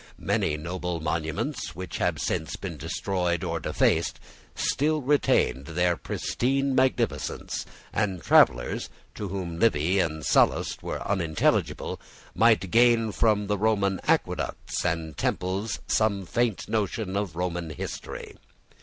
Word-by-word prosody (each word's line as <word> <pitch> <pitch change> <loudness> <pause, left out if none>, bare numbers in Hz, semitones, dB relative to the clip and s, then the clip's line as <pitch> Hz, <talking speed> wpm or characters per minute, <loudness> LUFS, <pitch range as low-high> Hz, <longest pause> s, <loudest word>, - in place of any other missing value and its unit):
Many 75 -2 0
noble 90 +2 -3
monuments 80 - -2
which 95 +2 -5
have - - +1
since 80 -3 -2
been 95 -4 -6
destroyed 85 +3 -1
or 85 -2 -2
defaced - - +1 0.4
still 155 +2 +1
retained 125 - +2
their 90 +2 +1
pristine 135 +9 -1
magnificence; 130 0 0 0.3
and 95 -4 0
travellers, - - +4 0.2
to 105 - -5
whom 90 -3 -4
Livy 95 -3 +3
and 80 -4 -1
Sallust - - +2
were - - -4
unintelligible, 85 -5 0 0.3
might 110 -6 +3
gain 115 -2 +4
from 105 -1 +2
the 105 0 -1
Roman 100 -3 +2
aqueducts - - 0
and 80 -3 -2
temples 95 +5 -1
some 100 -3 +1
faint 115 +2 0
notion 105 -2 -1
of 100 -5 -2
Roman 85 -1 -2
history. 80 - -6
95 Hz, 120 wpm, -27 LUFS, 85-110 Hz, 0.4 s, travellers